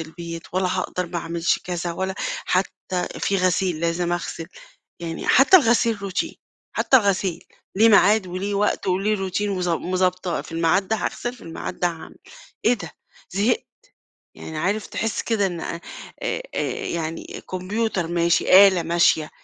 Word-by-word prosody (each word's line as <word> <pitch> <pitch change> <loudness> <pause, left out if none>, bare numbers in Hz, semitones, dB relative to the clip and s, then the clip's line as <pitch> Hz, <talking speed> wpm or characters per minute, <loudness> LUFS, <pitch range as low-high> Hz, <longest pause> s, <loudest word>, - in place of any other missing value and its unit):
البيت، 165 +1 -7
ولا 185 0 +1
هاقدر 180 -1 -2
ما 170 0 -4
أعملش 170 +1 0
كذا، 175 -1 -3
ولا 190 +2 -3 0.3
حتى 185 -1 -1
في 195 - +1
غسيل 185 -2 +1
لازم 170 +1 0
أغسل، 170 -1 -4 0.5
يعني 165 -1 -5
حتى 280 +9 +7
الغسيل 235 - +2
routine، 195 -1 -3 0.4
حتى 265 - +4
الغسيل، 195 -5 0 0.3
ليه 225 +3 +6
ميعاد 205 -1 +5
وليه 185 +3 -3
وقت 205 0 0
وليه 195 +1 0
routine، 185 - -1
وضب 180 -3 -1
مضبطاه 185 -1 0
في - - -13
الميعاد 165 +4 +1
ده 220 - +1
هاغسل 240 +2 -3
في 250 - -16
الميعاد 165 +2 -7
ده 175 - +3
هاعمل، 165 -2 -8 0.5
إيه 235 - +6
ده! 170 -10 -6 0.4
زهقت، 210 - +1 0.7
يعني، 160 -1 -7
عارف 200 +6 -1
تحس 225 -2 -2
كده 215 -4 +1
إن 175 -3 -4
آآ، 170 - -5 0.4
آآ - - -3 0.3
يعني 165 -1 -4
كمبيوتر 190 0 -1
ماشي، 170 +3 +5
آلة 185 -3 0
ماشية، 165 -2 +2
185 Hz, 150 wpm, -23 LUFS, 170-200 Hz, 0.7 s, حتى